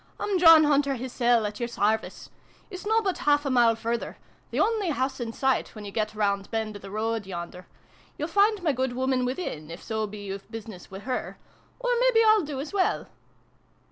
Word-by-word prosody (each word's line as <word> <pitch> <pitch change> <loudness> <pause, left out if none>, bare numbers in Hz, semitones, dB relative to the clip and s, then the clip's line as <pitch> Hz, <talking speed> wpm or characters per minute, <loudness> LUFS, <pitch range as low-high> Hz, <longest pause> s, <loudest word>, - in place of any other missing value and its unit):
" - - -35
I'm 400 -3 0
John 325 -2 +9
Hunter 285 -2 +2
hissel, 240 -2 +1
at 210 0 -5
your 240 -1 -2
sarvice. 220 -1 -1 0.4
It's 370 +2 -7
nobbut 440 -4 +1
half 290 0 +2
a 275 - 0
mile 240 -2 +4
further 230 +1 -3 0.3
the - - -2
only 435 -5 +1
house 265 -3 -1
in 235 -2 -3
sight, 265 +1 0
when 210 -1 -8
you 200 - -7
get 215 0 -2
round 200 -2 0
bend 220 -2 -3
o' - - -7
the 195 - -10
road 220 0 -2
yonder. 180 0 -7 0.5
You'll 300 - -2
find 405 +2 +2
my 320 - +3
good 260 -1 -1
woman 260 0 0
within, 250 - -4
if 170 +2 -9
so 220 -1 -2
be 205 0 -9
you've 195 +1 -7
business 220 -5 -9
wi' 195 +1 -8
her. 255 +3 -4 0.4
Or - - -2
mebbe - - +3
I'll 435 -1 +6
do 290 -4 -5
as 290 +6 -6
well 380 -2 0
245 Hz, 205 wpm, -26 LUFS, 215-305 Hz, 0.5 s, John